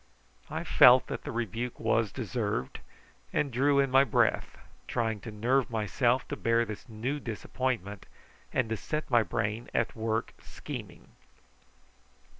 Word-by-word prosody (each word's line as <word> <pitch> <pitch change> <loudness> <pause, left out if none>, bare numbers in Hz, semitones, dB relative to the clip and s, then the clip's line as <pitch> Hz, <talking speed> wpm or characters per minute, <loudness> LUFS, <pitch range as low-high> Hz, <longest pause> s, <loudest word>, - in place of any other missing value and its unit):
I - - -3
felt 125 +1 +7
that - - -6
the - - -4
rebuke 120 +1 -3
was 115 -1 +1
deserved, 105 - -3 0.5
and 145 - 0
drew 140 +3 +3
in 135 -1 +2
my 135 +1 +6
breath, 120 -5 +1 0.3
trying 115 -3 -1
to 115 - -8
nerve 120 +5 +1
myself 120 +3 +1
to - - -2
bear 115 0 +2
this 110 +3 -8
new 120 +7 -3
disappointment, 110 -4 -3 0.4
and 125 - +1
to 110 - 0
set 155 +6 -4
my 120 -1 +6
brain 110 +1 -2
at 120 - 0
work 110 0 -2
scheming. - - -9
115 Hz, 140 wpm, -29 LUFS, 110-130 Hz, 0.5 s, felt